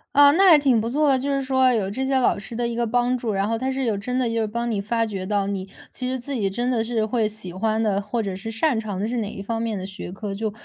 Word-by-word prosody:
呃， 285 0 +8
那 380 +5 +5
还 325 - +9
挺 265 -6 +3
不 230 - -2
错 295 +4 +2
的， 265 -1 +3
就 275 +2 -3
是 275 -1 +1
说 260 -1 +3
有 205 -5 0
这 260 +6 -2
些 265 0 +2
老 250 -5 +2
师 205 +3 -8
的 240 +1 0
一 235 - -3
个 235 0 0
帮 245 +2 +1
助， 235 -3 -2
然 195 +1 0
后 230 - 0
他 260 +3 -2
是 265 0 -2
有 225 -4 +1
真 250 +5 -3
的 255 -2 +1
就 230 - -3
是 220 - 0
帮 235 +3 -2
你 205 -3 -1
发 230 +3 0
掘 195 -4 -5
到 205 -1 +1
你 195 -1 -3 0.2
其 255 - -5
实 260 +1 -1
自 275 +3 -6
己 210 -7 0
真 240 +6 -1
的 230 -3 +1
是 225 -1 -1
会 220 0 +1
喜 210 -4 -8
欢 220 +4 0
的， 200 -2 +1
或 220 +3 -2
者 195 -2 -3
是 205 +4 -6
擅 225 +3 +1
长 210 -4 -4
的 205 - -1
是 245 +2 -2
哪 215 -3 -2
一 195 - -7
方 225 +2 -3
面 225 -2 -2
的 185 - -5
学 190 -2 -7
科， 200 +1 -5
就 215 +2 -2
225 Hz, 345 characters per minute, -23 LUFS, 205-255 Hz, 0.2 s, 还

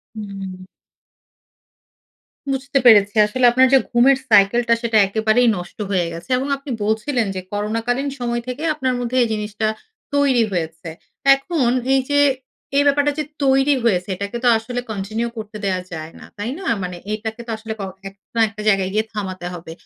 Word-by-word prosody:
হুম। 195 -3 -7 1.9
বুঝতে 275 +1 0
পেরেছি। 205 -3 +6
আসলে 250 +4 -1
আপনার 255 +2 +5
যে 270 - +8
ঘুমের 255 +3 +5
সাইকেলটা, 230 +3 +5
সেটা 230 -2 +2
একেবারেই 220 +4 +2
নষ্ট 175 0 -10
হয়ে 180 -3 +1
গেছে। 170 +9 -9
এবং 265 - -2
আপনি 275 +1 -10
বলছিলেন 220 +3 0
যে - - -2
করোনাকালীন 230 +6 -1
সময় 240 -1 -2
থেকে 255 +4 -5
আপনার 260 -4 -1
মধ্যে 245 +1 -2
এই 235 - +1
জিনিসটা 210 0 -2 0.5
তৈরি 275 -5 +3
হয়েছে। 165 -1 -4 0.5
এখন 275 -1 -1 0.3
এইযে 270 +2 +2 0.6
এই 285 - +5
ব্যাপারটা 285 +1 +3
যে 305 - 0 0.2
তৈরি 270 +1 +4
হয়েছে, 180 -5 +1
এটাকে 200 +4 -5
তো - - +5
আসলে 245 +2 -4
continue 220 +3 -3
করতে 215 -1 -7
দেয়া 185 -2 0
যায় 160 0 -6
না। - - -12
তাই 205 +4 -4
না? 385 - -8 0.2
মানে 180 -1 -4 0.2
এটাকে 220 +2 -5
তো - - -6
আসলে 220 0 -6
ক - - -3 0.3
এক 195 - -16 0.2
না - - +2
একটা 210 0 -9
জায়গায় 195 -2 +2
গিয়ে 215 +1 +2
থামাতে 185 -4 -5
হবে। 165 -2 -9
225 Hz, 165 wpm, -20 LUFS, 200-255 Hz, 1.9 s, যে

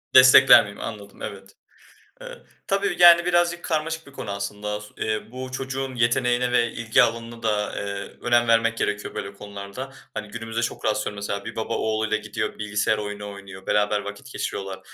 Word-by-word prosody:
"Destekler 130 0 +9
miyim?" 100 0 -10
Anladım, 100 -2 -8
evet. 95 0 -8 0.7
Eee, - - -10 0.2
tabii, 195 -2 0
yani 170 0 +8
birazcık 175 -1 +2
karmaşık 160 0 -2
bir - - -13
konu 105 -6 -6
aslında. 105 +1 -4
S 105 - -11
eee, 110 +1 -3
bu 130 0 -7
çocuğun 130 0 -4
yeteneğine 120 +1 +2
ve 120 -1 +3
ilgi 115 0 +3
alanına 115 0 -3
da, 105 -2 0
eee, 100 -1 -5
önem 120 -1 +3
vermek 115 0 +3
gerekiyor 105 -2 -2
böyle 100 - -5
konularda. 100 +6 -8 0.2
Hani, 105 0 -5
günümüzde 115 +1 -4
çok 115 - -3
rastlıyorum 105 -1 0
mesela, 100 0 -4
bir 110 - -7
baba 110 +1 -2
oğluyla 110 0 0
gidiyor, 110 0 -4
bilgisayar 105 +1 0
oyunu 105 -1 -5
oynuyor, 95 -1 -11
beraber 105 0 +2
vakit 105 +7 -8
geçiriyorlar. 95 -1 -4
110 Hz, 170 wpm, -24 LUFS, 105-130 Hz, 0.7 s, Destekler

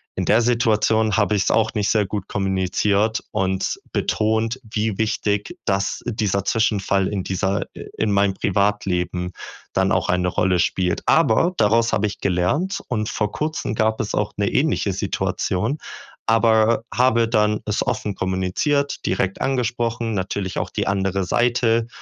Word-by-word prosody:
In 95 - -2
der 110 +5 +4
Situation 110 -2 +2
habe 105 0 +2
ich's 100 - +1
auch 115 - +2
nicht 105 -1 0
sehr 105 -2 +2
gut 100 0 -4
kommuniziert 100 +3 0
und 95 0 -1
betont, 110 +3 0
wie 110 -2 -2
wichtig 105 - -1
das 100 0 -1
dieser 105 -5 -1
Zwischenfall 100 -4 +1
in 100 -3 -2
dieser 95 +1 -1
i - - -8
in 110 - +1
meinem 100 -1 +2
Privatleben 90 -3 0 0.4
dann - - +2
auch - - +1
eine 90 0 +1
Rolle 90 0 +1
spielt. 90 +1 0
Aber 165 +11 +3
daraus 115 +2 +3
habe 100 - +2
ich 105 - -4
gelernt, 100 - 0
und 110 -3 -1
vor 105 -1 -1
Kurzem 155 -7 -3
gab 110 0 +1
es 110 - -2
auch 105 0 -1
'ne 100 -1 +1
ähnliche 135 -8 +1
Situation, 95 +8 -1 0.5
aber 115 0 +3
habe 115 -2 +3
dann 105 -2 +1
es 105 -1 -1
offen 105 -2 -2
kommuniziert, 95 +11 -1
direkt 95 0 -1
angesprochen, 120 -3 -1
natürlich 95 -1 -2
auch - - -3
die - - -2
andere 95 0 0
Seite 115 +2 +1
105 Hz, 150 wpm, -21 LUFS, 95-115 Hz, 0.5 s, der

